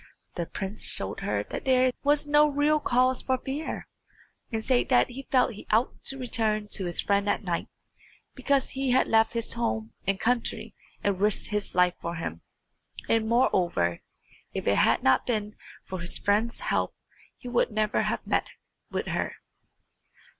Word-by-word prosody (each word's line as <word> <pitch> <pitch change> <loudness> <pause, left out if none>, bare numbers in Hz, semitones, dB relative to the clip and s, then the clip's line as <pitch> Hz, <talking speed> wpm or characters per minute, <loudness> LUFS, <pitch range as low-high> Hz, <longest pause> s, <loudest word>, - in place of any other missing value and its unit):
The 170 -2 -4
prince 195 +3 +3
showed - - -2
her - - -1
that - - -5
there 255 -1 +4
was 290 +1 +2
no 295 +1 +5
real 295 +1 +2
cause 255 -1 +2
for 260 -1 0
fear, 275 +5 -5 0.6
and 220 -1 -3
said 255 -2 +2
that 250 -1 +4
he 270 +2 -9
felt 250 -2 +3
he 205 - -12
ought 225 +4 +1
to 270 - 0
return 220 -4 +1
to 195 -2 -1
his 175 -1 -3
friend 200 0 +1
at - - 0
night, 175 -3 -2 0.7
because 275 -2 0
he 270 0 -2
had 255 +1 +3
left 225 0 +3
his 230 -1 0
home 110 - -2
and 195 -1 +1
country 235 +1 -1 0.3
and 200 -2 0
risked 210 +1 +1
his 210 -2 -2
life 180 -1 +4
for 170 0 -4
him; 85 - -5 0.7
and, 225 -1 +2
moreover, 175 - +1 0.5
if - - -3
it - - +3
had - - +3
not 130 - +3
been 215 -3 -2 0.3
for 185 - -6
his 170 +1 -1
friend's 215 - 0
help - - -1 0.4
he 250 - -11
would 245 -1 +1
never 215 -1 0
have - - -2
met - - 0 0.4
with - - -3
her. - - -2
225 Hz, 170 wpm, -27 LUFS, 195-255 Hz, 0.7 s, no